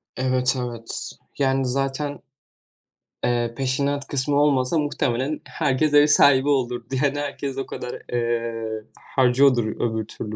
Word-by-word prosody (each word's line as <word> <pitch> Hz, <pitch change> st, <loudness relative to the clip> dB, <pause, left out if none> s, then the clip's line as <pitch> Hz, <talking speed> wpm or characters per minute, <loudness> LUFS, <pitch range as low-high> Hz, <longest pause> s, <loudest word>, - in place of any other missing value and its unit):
Evet, 130 Hz, 0 st, +1 dB
evet, 120 Hz, -2 st, -5 dB, 0.3 s
yani 135 Hz, -1 st, +1 dB
zaten, 135 Hz, +2 st, -2 dB, 1.0 s
eee, 120 Hz, -1 st, 0 dB
peşinat 140 Hz, +2 st, 0 dB
kısmı 140 Hz, +1 st, 0 dB
olmasa 140 Hz, +1 st, +2 dB
muhtemelen 145 Hz, -1 st, -1 dB
herkes 150 Hz, 0 st, 0 dB
ev 145 Hz, 0 st, +7 dB
sahibi 140 Hz, -1 st, +5 dB
olurdu 125 Hz, -4 st, 0 dB, 0.2 s
yani 145 Hz, 0 st, +1 dB
herkes 140 Hz, -1 st, -4 dB
o 135 Hz, -, -2 dB
kadar, 125 Hz, -, -7 dB
eee, 115 Hz, -2 st, -2 dB, 0.3 s
harcıyordur 130 Hz, -1 st, +4 dB, 0.2 s
öbür 110 Hz, -2 st, -1 dB
türlü 110 Hz, 0 st, -6 dB
130 Hz, 120 wpm, -23 LUFS, 120-140 Hz, 1.0 s, ev